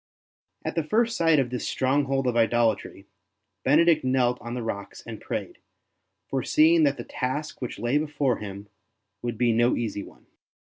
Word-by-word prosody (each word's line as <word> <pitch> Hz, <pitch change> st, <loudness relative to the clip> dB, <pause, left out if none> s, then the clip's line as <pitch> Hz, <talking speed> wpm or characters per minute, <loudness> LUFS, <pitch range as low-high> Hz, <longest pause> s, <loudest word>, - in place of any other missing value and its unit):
At -, -, -2 dB
the 165 Hz, -, 0 dB
first 230 Hz, +8 st, +1 dB
sight 165 Hz, -2 st, +3 dB
of 130 Hz, -3 st, +1 dB
this 125 Hz, -, -3 dB
stronghold 135 Hz, 0 st, +1 dB
of 125 Hz, -2 st, 0 dB
idolatry 115 Hz, -1 st, +1 dB, 0.6 s
Benedict 155 Hz, +3 st, +4 dB
knelt 125 Hz, -1 st, +1 dB
on 120 Hz, +1 st, -5 dB
the 125 Hz, -, -4 dB
rocks 100 Hz, -3 st, -6 dB
and -, -, -8 dB
prayed, -, -, -5 dB, 0.7 s
foreseeing 155 Hz, +5 st, +3 dB
that 140 Hz, 0 st, +1 dB
the -, -, -5 dB
task 140 Hz, +4 st, -4 dB
which 125 Hz, -, -4 dB
lay 120 Hz, +7 st, +1 dB
before 145 Hz, -4 st, 0 dB
him 100 Hz, 0 st, -8 dB, 0.5 s
would 120 Hz, -2 st, -3 dB
be 120 Hz, -1 st, +2 dB
no 120 Hz, +2 st, +3 dB
easy 110 Hz, -3 st, -3 dB
one. -, -, -14 dB
130 Hz, 165 wpm, -26 LUFS, 120-150 Hz, 0.7 s, Benedict